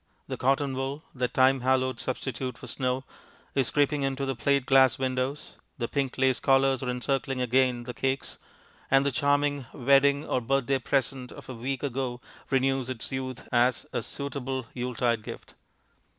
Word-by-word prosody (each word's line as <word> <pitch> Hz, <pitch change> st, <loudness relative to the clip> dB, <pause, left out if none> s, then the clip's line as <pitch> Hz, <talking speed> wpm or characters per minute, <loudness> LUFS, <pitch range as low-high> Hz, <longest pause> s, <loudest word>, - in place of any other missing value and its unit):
The -, -, -3 dB
cotton 135 Hz, +1 st, +1 dB
wool, 135 Hz, +3 st, -3 dB
that 125 Hz, -2 st, -1 dB
time 130 Hz, +1 st, +5 dB
hallowed 130 Hz, -1 st, +1 dB
substitute 130 Hz, 0 st, -3 dB
for -, -, -10 dB
snow, 130 Hz, 0 st, -2 dB, 0.5 s
is 135 Hz, -3 st, +2 dB
creeping 145 Hz, 0 st, +2 dB
into 135 Hz, 0 st, -1 dB
the 135 Hz, -1 st, -2 dB
plate 140 Hz, +2 st, +1 dB
glass 135 Hz, -1 st, +5 dB
windows; 130 Hz, +2 st, -2 dB, 0.2 s
the 120 Hz, -3 st, -2 dB
pink 135 Hz, -1 st, -2 dB
lace 130 Hz, -1 st, +3 dB
collars 135 Hz, -1 st, +3 dB
are 130 Hz, -, -2 dB
encircling 135 Hz, +1 st, -1 dB
again 125 Hz, 0 st, +2 dB
the 125 Hz, +1 st, -6 dB
cakes; 135 Hz, +3 st, -2 dB, 0.5 s
and 135 Hz, +1 st, +4 dB
the 140 Hz, -, +2 dB
"charming 145 Hz, 0 st, +1 dB
wedding 140 Hz, +2 st, +4 dB
or 125 Hz, -, 0 dB
birthday 135 Hz, +2 st, +1 dB
present" 130 Hz, 0 st, -1 dB
of -, -, -11 dB
a -, -, -4 dB
week 130 Hz, +3 st, -4 dB
ago 130 Hz, -2 st, -2 dB, 0.3 s
renews 135 Hz, -1 st, +1 dB
its 130 Hz, 0 st, -4 dB
youth 130 Hz, -2 st, -4 dB
as 125 Hz, +2 st, +3 dB
a -, -, 0 dB
"suitable 135 Hz, -2 st, -4 dB
Yuletide 120 Hz, -2 st, 0 dB
gift." -, -, -9 dB
130 Hz, 165 wpm, -28 LUFS, 125-135 Hz, 0.5 s, time